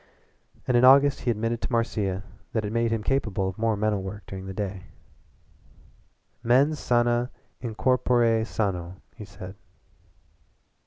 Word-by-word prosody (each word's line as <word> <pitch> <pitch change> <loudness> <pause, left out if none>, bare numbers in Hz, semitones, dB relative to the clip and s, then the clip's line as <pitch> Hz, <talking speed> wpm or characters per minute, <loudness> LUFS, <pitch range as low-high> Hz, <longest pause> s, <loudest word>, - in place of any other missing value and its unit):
And 125 - +2
in 120 - +4
August 140 +2 +6
he 125 - -2
admitted 115 +1 -1
to - - -4
Marcia 105 -5 -1 0.3
that 110 -2 0
it 105 - -3
made 115 0 +1
him 115 -1 -1
capable 105 -7 0
of 95 +1 -6
more 115 -1 +1
mental 105 -1 0
work 95 +2 -7
during 95 0 -8
the - - -5
day. 95 -2 -4 1.6
"MENS 135 +6 +3
SANA 120 0 +1 0.3
IN 115 -4 -5
CORPORE 120 -2 +2
SANO," 95 -6 -2 0.2
he 110 - -9
said. 95 -1 -10
115 Hz, 145 wpm, -26 LUFS, 100-120 Hz, 1.6 s, August